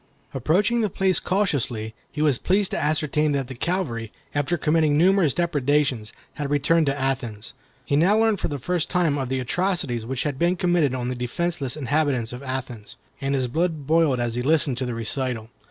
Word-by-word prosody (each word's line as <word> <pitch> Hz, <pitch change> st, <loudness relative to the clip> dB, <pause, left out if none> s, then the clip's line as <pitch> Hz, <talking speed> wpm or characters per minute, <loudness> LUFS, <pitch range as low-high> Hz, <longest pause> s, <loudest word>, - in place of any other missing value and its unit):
Approaching 185 Hz, -, +2 dB
the 215 Hz, -, +1 dB
place 190 Hz, -1 st, +2 dB
cautiously, 135 Hz, -, -1 dB, 0.2 s
he 150 Hz, -, -2 dB
was 145 Hz, -5 st, +2 dB
pleased 195 Hz, +1 st, +1 dB
to -, -, -1 dB
ascertain 150 Hz, 0 st, +1 dB
that 135 Hz, -2 st, -1 dB
the -, -, -5 dB
cavalry, 125 Hz, -, -2 dB, 0.2 s
after 145 Hz, +4 st, 0 dB
committing 155 Hz, -1 st, +2 dB
numerous 180 Hz, -2 st, +4 dB
depredations, 145 Hz, -8 st, +1 dB, 0.2 s
had 145 Hz, -2 st, -4 dB
retreated 150 Hz, +3 st, +2 dB
to 140 Hz, +1 st, 0 dB
Athens. 120 Hz, -5 st, -3 dB, 0.3 s
He 140 Hz, -, 0 dB
now 180 Hz, +8 st, +4 dB
learned 220 Hz, -3 st, +2 dB
for -, -, -1 dB
the 145 Hz, -, -4 dB
first 175 Hz, +5 st, -1 dB
time 165 Hz, -6 st, +1 dB
of 130 Hz, -2 st, -3 dB
the 130 Hz, 0 st, -1 dB
atrocities 140 Hz, -, -1 dB
which 130 Hz, +2 st, -3 dB
had 145 Hz, -3 st, -3 dB
been 175 Hz, +2 st, +2 dB
committed 175 Hz, -7 st, +2 dB
on 125 Hz, -1 st, -2 dB
the 125 Hz, -, -2 dB
defenceless 135 Hz, +3 st, -2 dB
inhabitants 140 Hz, -4 st, 0 dB
of 125 Hz, -, -7 dB
Athens, 130 Hz, -5 st, -6 dB, 0.3 s
and 135 Hz, 0 st, 0 dB
his 130 Hz, -2 st, 0 dB
blood 160 Hz, +2 st, -1 dB
boiled 155 Hz, -4 st, +3 dB
as 120 Hz, -1 st, -1 dB
he 120 Hz, -, -1 dB
listened 140 Hz, -2 st, +2 dB
to 130 Hz, -, -2 dB
the 120 Hz, -, -3 dB
recital. 115 Hz, 0 st, -3 dB
145 Hz, 190 wpm, -24 LUFS, 125-170 Hz, 0.3 s, numerous